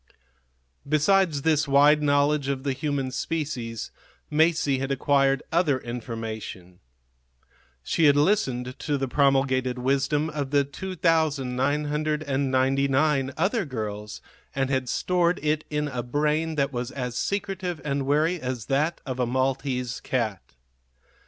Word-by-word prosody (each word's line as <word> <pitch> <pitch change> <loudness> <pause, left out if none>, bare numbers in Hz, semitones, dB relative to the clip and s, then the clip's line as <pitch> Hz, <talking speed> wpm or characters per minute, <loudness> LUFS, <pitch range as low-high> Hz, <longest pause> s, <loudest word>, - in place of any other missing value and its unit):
Besides 155 -1 +3
this 155 -2 +2
wide 145 +2 +5
knowledge 145 0 +2
of 135 -1 -2
the 140 -1 0
human 140 -2 -2
species, 130 -8 -3 0.4
Masie 155 -3 +2
had 135 +1 -2
acquired 135 0 +2
other 160 -5 +2
information. 115 -7 -7 1.0
She 160 - +1
had 145 -1 +6
listened 135 - +1
to 145 -2 -1
the 135 0 -2
promulgated 130 -1 +2
wisdom 140 +4 0
of 145 -3 -3
the 140 0 +3
2,999 140 -3 0
other 200 +7 +1
girls 105 -7 -5 0.3
and 135 0 0
had 130 -2 0
stored 180 -1 +1
it 155 0 0
in 150 0 -1
a 130 -4 -3
brain 150 +5 0
that 140 -1 0
was 120 0 -3
as 125 -3 -5
secretive 190 -3 -2
and 140 -2 -1
wary 155 +4 +2
as 125 -3 -4
that 150 +5 0
of 130 -2 -4
a 125 - +1
Maltese 130 -1 -1
cat. 110 - -3
140 Hz, 125 wpm, -25 LUFS, 130-155 Hz, 1.0 s, had